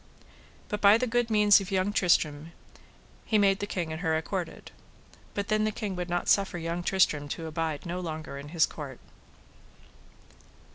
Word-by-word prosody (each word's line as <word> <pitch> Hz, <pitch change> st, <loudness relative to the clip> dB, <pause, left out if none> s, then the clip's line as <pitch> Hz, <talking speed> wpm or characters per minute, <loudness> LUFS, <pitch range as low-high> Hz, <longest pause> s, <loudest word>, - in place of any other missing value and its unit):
But 210 Hz, -, -4 dB
by 205 Hz, +2 st, +7 dB
the 255 Hz, -, 0 dB
good 240 Hz, -1 st, 0 dB
means 210 Hz, -2 st, +5 dB
of 195 Hz, -, -7 dB
young 195 Hz, +1 st, 0 dB
Tristram 160 Hz, -4 st, +1 dB, 0.7 s
he 220 Hz, -, +1 dB
made 195 Hz, -1 st, +3 dB
the 205 Hz, -, -3 dB
king 175 Hz, -5 st, -3 dB
and 160 Hz, +1 st, -5 dB
her 160 Hz, -3 st, +1 dB
accorded. 175 Hz, +2 st, -5 dB, 0.6 s
But 200 Hz, -1 st, -3 dB
then 215 Hz, 0 st, +2 dB
the 215 Hz, -, +1 dB
king 210 Hz, -3 st, -4 dB
would 180 Hz, 0 st, -4 dB
not 175 Hz, 0 st, -1 dB
suffer 195 Hz, -3 st, +2 dB
young 170 Hz, +1 st, -3 dB
Tristram 175 Hz, -6 st, +1 dB
to 165 Hz, +3 st, -5 dB
abide 160 Hz, -1 st, -3 dB
no 175 Hz, +1 st, -3 dB
longer 155 Hz, -5 st, -6 dB
in 145 Hz, +1 st, -9 dB
his 165 Hz, 0 st, +3 dB
court. 140 Hz, -5 st, -8 dB
180 Hz, 175 wpm, -28 LUFS, 160-205 Hz, 0.7 s, by